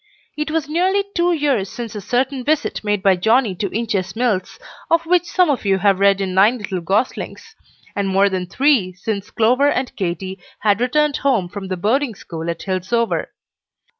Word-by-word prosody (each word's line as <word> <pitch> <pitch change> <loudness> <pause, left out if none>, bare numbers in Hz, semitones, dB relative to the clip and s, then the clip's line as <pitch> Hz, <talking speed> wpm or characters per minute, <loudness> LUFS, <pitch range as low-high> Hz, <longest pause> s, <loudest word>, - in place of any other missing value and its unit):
It 300 +1 -3
was 310 -2 -1
nearly 370 +6 +1
two 345 0 +2
years 280 - 0
since 235 -3 -6
a 210 - -6
certain 255 +5 -1
visit 300 -2 0
made 205 -2 -1
by 195 -1 +5
Johnnie 220 +3 +2
to 200 0 -2
Inches 215 -4 -2
Mills, 220 -6 -1 0.3
of 330 0 +2
which 355 +1 +3
some 365 0 +2
of 265 - -2
you 195 -2 +2
have 195 0 +2
read 200 0 +4
in 190 -1 -2
"Nine 205 +6 +4
Little 195 -5 -4
Goslings;" 245 - -2 0.4
and 200 -1 -1
more 195 +1 +4
than 185 -2 -2
three 250 -6 +2
since 200 +2 -4
Clover 255 +6 +3
and 260 -2 -2
Katy 185 0 -4 0.2
had 210 +1 +2
returned 295 +3 +2
home 245 -10 +1
from 195 0 -7
the 185 -1 -3
boarding 230 +6 0
school 165 -3 -6
at 170 - -4
Hillsover. 195 +5 -1
220 Hz, 185 wpm, -19 LUFS, 190-275 Hz, 0.4 s, by